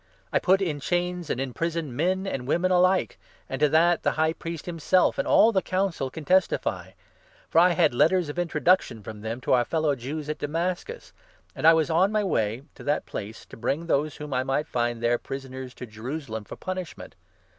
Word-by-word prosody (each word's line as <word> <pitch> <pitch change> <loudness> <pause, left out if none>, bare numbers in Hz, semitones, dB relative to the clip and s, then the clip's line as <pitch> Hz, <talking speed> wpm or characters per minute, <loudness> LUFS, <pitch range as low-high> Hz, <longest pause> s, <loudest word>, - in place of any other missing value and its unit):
I - - +4
put 190 +1 +3
in 155 -6 -2
chains, 175 +2 -2
and - - -1
imprisoned, 155 +1 -3
men 185 +6 0
and 130 -10 -4
women 180 +5 +1
alike 185 +1 +2
— - - -32
and 135 - -4
to 150 0 +4
that 170 +3 +4
the - - +1
High 160 +1 +1
Priest 165 -1 -7
himself 175 +2 +1
and - - 0
all 225 - +6
the 195 - +2
5 - - -33
Council 185 -8 -1
can 155 +3 -9
testify. 185 +2 +1 0.6
For 165 - +5
I 180 +1 +5
had 165 -5 +3
letters 165 +6 +3
of 145 +4 -5
introduction 170 - +1
from 105 +1 -8
them 110 +3 -4
to - - +1
our 125 -1 +4
fellow 155 -1 0
Jews 145 +5 -5
at 155 0 -4
Damascus, 175 - -3 0.4
and - - +2
I 165 - +8
was 160 0 +1
on 185 +5 +3
my 215 -1 +1
way 115 - -1
to - - -13
that 145 +1 0
place, 105 +2 -7
to - - -12
bring 145 +8 -2
those 150 -2 0
whom 150 -2 -7
I 130 - +1
might 135 +3 0
find 120 -3 -2
there 120 +1 +2
prisoners 130 -1 -7
to - - -7
Jerusalem 110 0 -6
for - - -8
punishment. 185 -2 -6
155 Hz, 210 wpm, -26 LUFS, 130-175 Hz, 0.6 s, I